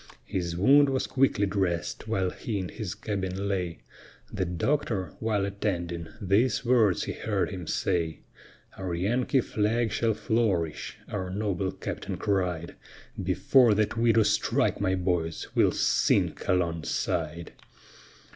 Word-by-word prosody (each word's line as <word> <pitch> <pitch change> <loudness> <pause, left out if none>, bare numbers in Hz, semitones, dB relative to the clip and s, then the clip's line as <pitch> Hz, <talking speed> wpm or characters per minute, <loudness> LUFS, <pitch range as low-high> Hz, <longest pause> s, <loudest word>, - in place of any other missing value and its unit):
His 85 +2 -3
wound 140 +9 +6
was 135 -1 0
quickly 130 -6 +2
dress'd, 95 -1 -2
while 95 -5 0
he 110 -3 -4
in 95 -2 -3
his 105 -6 -5
cabin 95 -1 -3
lay; 90 -7 -2 0.5
The 95 -3 -1
doctor, 95 - -1
while 105 -3 0
attending, 90 -4 -3
these 110 +4 +2
words 115 -6 +3
he - - -3
heard - - -1
him 90 -4 -6
say: 80 -3 -1 0.6
"Our 95 -3 -3
Yankee 120 +9 +1
flag 110 +1 0
shall 110 0 +1
flourish," 105 - -1
our 95 -3 -4
noble 95 -1 -1
captain - - -5
cried, 90 -4 -1 0.5
"Before 125 -5 +4
that 110 +2 +1
we 115 0 +3
do 110 0 +4
strike, 100 - +1
my 95 -2 +2
boys, 90 -3 -1
we'll - - +4
sink - - +1
alongside." 85 -1 -1
100 Hz, 130 wpm, -27 LUFS, 90-110 Hz, 0.6 s, wound